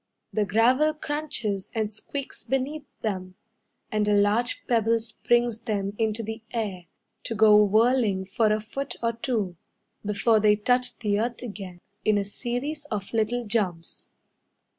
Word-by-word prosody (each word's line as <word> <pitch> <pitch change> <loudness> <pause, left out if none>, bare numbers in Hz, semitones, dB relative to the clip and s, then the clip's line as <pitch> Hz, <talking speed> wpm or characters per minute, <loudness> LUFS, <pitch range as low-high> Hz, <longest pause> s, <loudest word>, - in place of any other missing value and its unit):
The 215 -1 +2
gravel 250 +10 +3
crunches 290 -11 -2
and 215 -1 -1
squeaks 275 +6 -6
beneath 280 +3 -2 0.2
them, 185 -4 -3 0.6
And 210 -1 +1
a 210 - +4
large 210 +4 +2
pebble 230 -1 +2
springs 235 +1 0
them 200 -3 -2
into 220 0 0
the 220 +1 -5
air 200 -7 -3 0.4
To 230 - -2
go 210 -1 +7
whirling 215 -2 +3
for 215 +3 +2
a 215 - +2
foot 265 +4 -5
or 230 0 +2
two 225 -7 -2 0.5
Before 210 +2 +3
they 210 0 +5
touch 245 +4 +1
the 205 -3 0
earth 235 +2 -2
again 195 -6 -7 0.3
In 215 -1 +3
a 200 - 0
series 255 +8 -4
of 210 -8 -5
little 230 +2 0
jumps. 190 -7 -2
220 Hz, 145 wpm, -26 LUFS, 205-240 Hz, 0.6 s, go